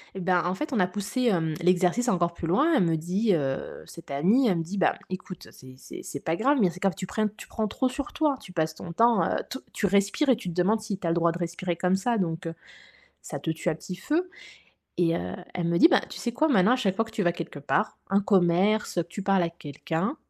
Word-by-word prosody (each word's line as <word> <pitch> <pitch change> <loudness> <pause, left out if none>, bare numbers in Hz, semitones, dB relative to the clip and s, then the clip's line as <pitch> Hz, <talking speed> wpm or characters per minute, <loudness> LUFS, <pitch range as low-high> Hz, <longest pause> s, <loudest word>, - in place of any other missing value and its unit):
Eh - - -4
bah, 180 -1 +2
en 180 +1 0
fait, 300 +6 -4
on 235 - +1
a 180 - +3
poussé, 205 +7 -3
hem, 170 -9 +1
l'exercice 180 +7 +2
encore 175 -5 +1
plus 170 - -5
loin. 285 - +3
Elle 260 - +4
me 165 -2 +2
dit, 185 +7 +1
heu, 135 -5 -2
cette 170 - -12
amie, 200 - +3
elle 185 -5 +2
me - - -1
dit: 190 +5 -6
«Bah, 185 - +3
écoute, 185 -1 -7
c'est 130 0 -14
c'est - - -10
c'est 140 - -6
pas 160 - -1
grave, 275 +9 +2
mais 190 - +4
c'est 175 +1 -9
que 195 - +1
tu 185 - -6
prennes 215 +2 0
tu - - -10
prends 220 -1 -2
trop 255 +5 0
sur 270 +2 -5
toi, 295 -3 +1
tu 180 - -12
passes 160 -2 -1
ton 170 - -8
temps, 230 -1 +4
heu, - - 0
te 265 - -4 0.2
tu 210 - -1
respires 200 - +2
et 255 - +6
tu 220 -5 -6
te - - -5
demandes 195 +5 +2
si 215 -2 -4
tu 190 - -8
as - - +2
le - - +1
droit 170 0 +3
de 170 - -6
respirer 175 +1 -3
comme 180 +2 +1
ça, 230 +5 0
donc 165 -4 -2
heu, 165 - -4 0.7
ça - - -6
te - - -4
tue 160 +2 -2
à 160 - -1
petit 180 +3 -8
feu», 310 - -1 0.7
et 170 -1 +3
heu, - - -4 0.2
elle 175 -2 -1
me 170 0 +2
dit: 330 - +8
«Ben, - - +5
tu - - -8
sais 240 - -3
quoi? 305 +7 +2
Maintenant, 220 -4 +4
à - - +4
chaque 195 -7 0
fois 225 - +2
que 225 - -13
tu 225 -2 -2
vas 175 - +2
quelque 170 -3 -7
part, 185 +9 -1
un 195 +1 +4
commerce, 195 +2 +2
que - - +3
tu 190 +3 -6
parles 195 -1 +3
à 170 - 0
quelqu'un, 165 - -4
185 Hz, 270 wpm, -26 LUFS, 170-220 Hz, 0.7 s, dit